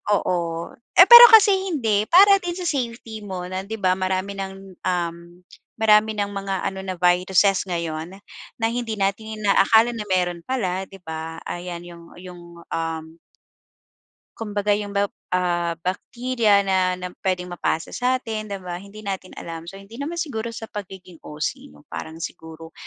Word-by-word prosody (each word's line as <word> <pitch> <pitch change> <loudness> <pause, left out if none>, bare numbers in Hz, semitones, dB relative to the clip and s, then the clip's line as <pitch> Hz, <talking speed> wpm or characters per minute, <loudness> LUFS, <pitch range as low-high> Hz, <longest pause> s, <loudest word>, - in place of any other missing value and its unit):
Oo, 170 -3 -2 0.3
eh 360 - +11
pero 475 0 +14
kasi 430 -2 +8 0.2
hindi, 220 -9 +1
para 395 +3 +7
din 350 -1 -4
sa 365 - -5
safety 235 -6 -3
mo 185 -2 -5
na 185 0 -3
'di 220 - -4
ba 185 -2 +3
marami 190 +1 -2
ng, 195 0 -4 0.3
um, 175 -2 -1 0.6
marami 220 0 +5
ng 205 -1 0
mga 195 -1 -3
ano 190 0 -5
na 185 - -2
viruses 180 +2 +3
ngayon 170 -1 -4 0.5
na 225 - +1
hindi 235 -2 -3
natin 215 +2 -2
inaakala 220 +3 +4
na 220 -3 -5
mayro'n 175 -2 0
pala 190 -7 -2
'di 195 - -13
ba. 160 0 -6
Ayan 175 -1 -6
'yong 170 -1 -12 0.2
'yong, 180 -1 -11 0.3
um 160 0 -4 1.2
Kumbaga 210 -2 -1
yung 205 0 -2
ba 200 - +3 0.2
ah, 175 -2 0
bacteria 220 +1 +1
na 185 -1 +1
na 180 0 -5
puwedeng 180 -1 -1
mapasa 165 -1 -2
satin 235 -4 -2
di 200 - -4
ba, 180 -1 -7
hindi 200 +2 -12
natin 190 -2 -4
alam. 165 0 -7
So, 195 - -11
hindi 195 +4 -13
naman 325 +4 -4
siguro 235 -9 -3
sa 230 -1 -7
pagiging 190 -5 -10
OC 155 +2 -5
'no? 75 0 -19
Parang 160 0 -7
siguro, 160 0 -9
195 Hz, 160 wpm, -22 LUFS, 175-220 Hz, 1.2 s, pero